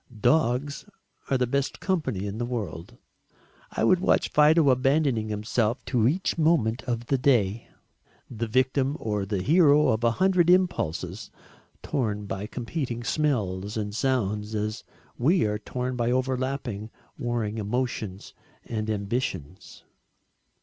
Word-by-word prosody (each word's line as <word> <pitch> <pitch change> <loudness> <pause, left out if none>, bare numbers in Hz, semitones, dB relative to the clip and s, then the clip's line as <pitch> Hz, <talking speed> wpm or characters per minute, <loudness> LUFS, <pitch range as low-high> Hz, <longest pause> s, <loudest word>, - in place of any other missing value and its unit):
Dogs 140 -1 +1 0.4
are 135 - +3
the 125 - +1
best 140 +3 -1
company 135 - -1
in 100 +2 -5
the - - -1
world 105 -9 -5 0.7
I - - -2
would 175 +11 +4
watch 190 - +2
Fido 150 -1 +5
abandoning 130 -3 +1
himself 110 +3 -1
to 120 -4 +2
each 175 +4 0
moment 135 -8 +2
of 120 -2 -2
the 135 +2 0
day, 115 -5 +2 0.6
the 115 -1 -4
victim 130 +4 +1
or 105 -3 -2
the 100 -3 -2
hero 150 - +5
of 110 +1 0
a 115 - +5
hundred 180 +6 +2
impulses, 105 - +1 0.5
torn 105 -6 -2
by 100 +1 -4
competing 120 0 -4
smells 105 -9 -1
and 105 -1 -3
sounds 105 -4 -1
as 110 +1 -3 0.4
we 155 - +3
are 105 0 -1
torn 125 +4 -4
by 120 -1 0
overlapping 130 -4 -2 0.3
warring 115 -3 -2
emotions 110 -3 -3 0.3
and 110 -2 -3
ambitions. 100 - -4
120 Hz, 130 wpm, -26 LUFS, 105-135 Hz, 0.7 s, Fido